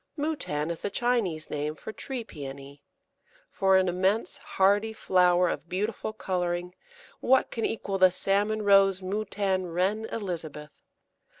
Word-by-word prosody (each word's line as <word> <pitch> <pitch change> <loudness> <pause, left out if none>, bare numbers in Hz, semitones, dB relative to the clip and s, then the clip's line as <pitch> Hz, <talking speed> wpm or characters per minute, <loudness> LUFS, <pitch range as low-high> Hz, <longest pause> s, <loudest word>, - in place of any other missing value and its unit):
Moutan 230 - -2
is 170 - -4
the - - -3
Chinese 200 -8 -1
name 150 +1 -2
for 220 - -8
Tree 260 0 -5
Pæony. 140 -5 -9 0.7
For 190 -1 +3
an 190 0 +2
immense 190 +5 0
hardy 205 +3 +2
flower 180 -3 +3
of 170 - -4
beautiful 210 +3 -2
colouring 180 -3 -2 0.5
what 260 +1 +3
can 230 - -2
equal 200 -3 -3
the 185 0 +7
salmon 205 +4 0
rose 195 -2 +5
Moutan 195 -1 -1
Reine 190 +6 0
Elizabeth? 160 -9 -5
190 Hz, 130 wpm, -27 LUFS, 175-215 Hz, 0.7 s, the